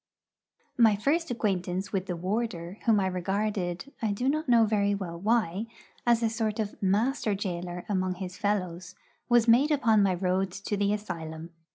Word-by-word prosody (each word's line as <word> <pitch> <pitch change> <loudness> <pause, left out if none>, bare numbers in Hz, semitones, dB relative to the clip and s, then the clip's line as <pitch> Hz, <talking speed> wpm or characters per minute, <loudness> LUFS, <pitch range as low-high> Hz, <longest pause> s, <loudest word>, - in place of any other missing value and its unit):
My 220 -3 +6
first 300 +11 0
acquaintance 195 -4 -2
with 190 -1 -1
the 180 - -2
warder 185 0 -3
whom 225 -3 +4
I 195 - +1
regarded 190 +3 -2
I 220 -2 0
do 245 +6 -1
not 310 +2 0 0.2
very 205 -1 +2
well 190 -4 -5
know 170 - -7
why 215 -1 +1 0.4
as 235 -1 +4
a - - +4
sort 220 -2 -1
of 210 -2 -2
master 210 +3 +1
gaoler 180 -2 -4
among 185 -2 0
his 185 -1 -6
fellows, 185 -4 -2 0.3
was 240 -1 +4
made 250 +6 +5
upon 235 -8 +3
my 195 -2 +3
road 185 +1 0
to 200 +2 -3
the 200 0 +1
asylum. 165 -5 -5
200 Hz, 170 wpm, -28 LUFS, 180-225 Hz, 0.4 s, My